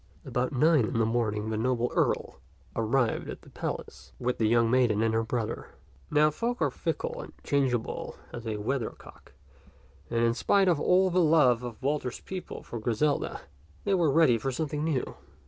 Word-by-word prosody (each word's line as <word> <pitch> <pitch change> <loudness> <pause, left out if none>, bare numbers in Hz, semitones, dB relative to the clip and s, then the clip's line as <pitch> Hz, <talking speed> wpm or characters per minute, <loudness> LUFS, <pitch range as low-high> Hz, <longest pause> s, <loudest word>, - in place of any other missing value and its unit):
About 125 +1 -1
nine 150 -1 +4
in 110 - -2
the 115 - +3
morning 110 -2 -1
the 110 - -1
noble 120 +1 0
Earl - - 0 0.4
arrived 115 +2 0
at - - -8
the - - -16
palace - - -6
with 125 0 -2
the 110 - +3
young 115 0 +3
maiden 120 -4 +3
and 115 -1 +1
her 115 - +2
brother. 115 0 -4 0.3
Now 150 +1 +4
folk 240 - -2
are - - +1
fickle - - -3
and - - -10
changeable 130 -5 -1 0.2
as 120 -1 -6
a 110 -1 -2
weathercock, 115 - -5 0.8
and 115 0 0
in 115 0 +3
spite 195 +10 +3
of 170 -5 +3
all 185 +3 +3
the 180 +1 +3
love 150 -7 +4
of 120 0 -8
Walter's 140 -3 -1
people 185 -1 -7
for 120 - -6
Griselda, 120 +6 0 0.4
they 200 - +1
were 170 -5 +3
ready 135 -6 +4
for 135 - -2
something 150 +2 -2
new. 155 -5 -1
125 Hz, 180 wpm, -28 LUFS, 115-150 Hz, 0.8 s, nine